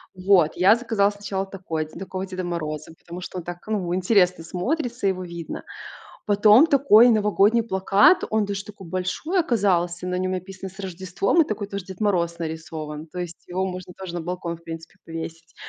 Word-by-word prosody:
Вот. 185 -4 +4
Я 195 +5 +6
заказала 225 -4 +1
сначала 200 -1 -3
такой 180 -5 -4
дь 155 - -17
такого 190 0 -4
Деда 185 -1 -5
Мороза, 155 -3 -4
потому 175 +1 -9
что 180 0 -6
он - - -8
так, 175 0 -8
ну, 185 -5 -1
интересно 180 -3 +3
смотрится, 240 - -2
его 185 -1 -1
видно. 170 -2 -7 0.6
Потом 210 +6 +6
такой 255 -6 +6
новогодний 210 +1 +3
плакат, 200 - +4
он 220 -1 +1
даже 200 0 -4
такой 200 -3 -11
большой 185 - -1
оказался, 180 - +1
на 180 - -2
нём 185 0 -1
написано: 190 +1 -6
"С 190 - -19
Рождеством", 190 - +1
и - - -4
такой 210 -1 -3
тоже 200 -2 -5
Дед 190 +1 -10
Мороз 170 -5 +1
нарисован, 160 -2 -6
то 180 +4 -9
есть 175 -1 -7
его 185 +2 -1
можно 185 0 -6
тоже 185 -2 -7
на 175 - -2
балкон 175 0 -4
в 170 - -23
принципе 165 +1 -8
повесить. 165 0 -7
185 Hz, 185 wpm, -24 LUFS, 175-205 Hz, 0.6 s, Я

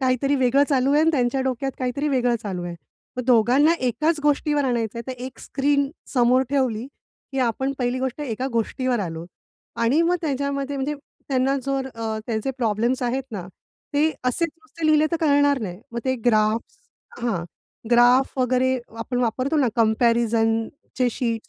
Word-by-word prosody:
काहीतरी 260 +2 +1
वेगळं 260 +2 +3
चालू 270 -1 +2
आहे 295 - +4
आणि 320 +1 +4
त्यांच्या 265 -2 +1
डोक्यात 265 +1 -1
काहीतरी 260 +3 -1
वेगळं 245 -3 +2
चालू 185 -4 -4
आहे. 175 - -5 0.4
मग 250 - -2
दोघांना 255 +6 +5
एकाच 305 +6 0
गोष्टीवर 295 0 +1
आणायचंय 235 -2 -1
तर 260 - -3
एक 255 +1 -7
स्क्रीन 280 0 0 0.3
समोर 250 +1 +4
ठेवली 255 -4 0 0.5
की 270 - -2
आपण 265 +4 -1
पहिली 245 0 0
गोष्ट 260 +2 -3
एका 255 -2 -3
गोष्टीवर 245 +2 0
आलोत 165 -2 -5 0.5
आणि 245 +8 +3
मग 355 +2 +2
त्याच्यामध्ये 280 -2 -2
म्हणजे 275 +2 -2 0.3
त्यांना 270 0 +1
जर 270 -1 -1
अ, 225 -1 -3
त्याचे 225 +3 -1
प्रॉब्लेम्स 235 +2 0
आहेत 250 +2 0
ना, 195 -5 -6 0.5
ते 305 +2 +3
असेच 290 +7 +1
नुसते 320 0 -6
लिहिले 310 0 +4
तर 335 - +3
कळणार 285 -2 +3
नाही. 185 -3 -5
मग 235 - -3
ते 260 -1 +1
ग्राफ्स 215 0 +2 0.4
हां, 215 -8 -1 0.5
ग्राफ 245 +2 +5
वगैरे 255 +1 +2 0.2
आपण 245 +2 -3
वापरतो 255 +5 0
ना, 270 -4 +3
कंपॅरिझनचे 230 +2 +1
शीट्स 230 -1 -3
255 Hz, 160 wpm, -23 LUFS, 235-280 Hz, 0.5 s, दोघांना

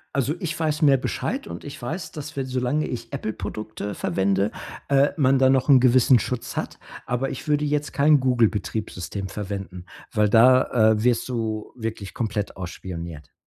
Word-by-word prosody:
Also, 140 +2 +1
ich 160 -2 -3
weiß 155 -1 0
mehr 140 -2 +6
Bescheid - - -3
und 85 +1 -8
ich 145 - -9
weiß, 160 +9 -5
dass, 150 0 -8
wenn 135 - -1
solange 130 +4 -1
ich 125 - -5
„Apple“ 125 -6 -3
Produkte 105 0 -6
verwende, 95 +3 0 0.4
äh, 140 +1 +4
man 135 -2 +3
da 130 0 +5
noch 130 +1 +2
'n 135 -2 +8
gewissen 125 0 +5
Schutz 125 +2 -4
hat. - - -4 0.3
Aber 125 +2 -1
ich 135 - -7
würde 150 0 +2
jetzt 150 0 -1
kein 150 +1 +5
„Google“ 125 -3 +3
Betriebssystem 100 -2 -4
verwenden, 95 -3 -6 0.3
weil 105 -1 +2
da, 120 0 +5
äh, 110 0 0
wirst 120 -1 +2
du 110 -3 -3
wirklich 110 -4 -5
komplett 105 -3 -3
ausspioniert. 85 -4 -7
120 Hz, 175 wpm, -24 LUFS, 105-135 Hz, 0.4 s, n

